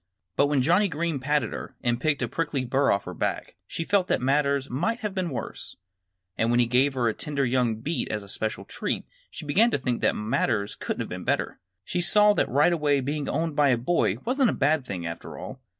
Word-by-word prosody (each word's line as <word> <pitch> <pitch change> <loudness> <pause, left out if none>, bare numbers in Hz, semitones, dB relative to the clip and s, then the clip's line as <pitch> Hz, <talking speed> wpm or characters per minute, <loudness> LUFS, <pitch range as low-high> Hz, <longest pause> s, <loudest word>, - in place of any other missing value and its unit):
But 140 - +4
when 140 -3 +2
Johnnie 180 +8 +4
Green 165 -3 -2
patted 145 +3 0
her 135 - -7
and 120 0 0
picked 150 -2 +1
a - - 0
prickly 150 -5 -2
burr 135 +3 +2
off 100 - +1
her - - -7
back - - -3
she 165 - -3
felt 190 +1 +2
that - - +1
matters 140 +1 +1
might 195 - -1
have 210 -3 -3
been 185 -3 -1
worse. 130 - -6 0.6
And 115 - +2
when 120 0 +3
he 120 - +5
gave 130 +3 +2
her 120 -2 +1
a 110 - +1
tender 140 0 -2
young 125 -2 +1
beet 145 +9 -3
as 105 -1 -3
a - - -13
special 110 +2 -4
treat - - -3 0.2
she - - -9
began 200 +11 +4
to - - +1
think 125 -3 -2
that - - +2
matters 110 -2 0
couldn't - - -4
have - - -5
been - - -6
better. - - -1 0.2
She 175 - -2
saw 210 +4 +5
right 150 +7 +3
away 150 -3 +2
that 130 - -4
being 145 +1 -2
owned 160 -2 -1
by 145 -1 +4
a 125 - +3
boy 150 +9 +1
wasn't 260 0 +3
a - - 0
bad 145 -1 +1
thing, 90 -3 -4
after 85 0 -6
all. 130 - -8
140 Hz, 230 wpm, -26 LUFS, 125-165 Hz, 0.6 s, he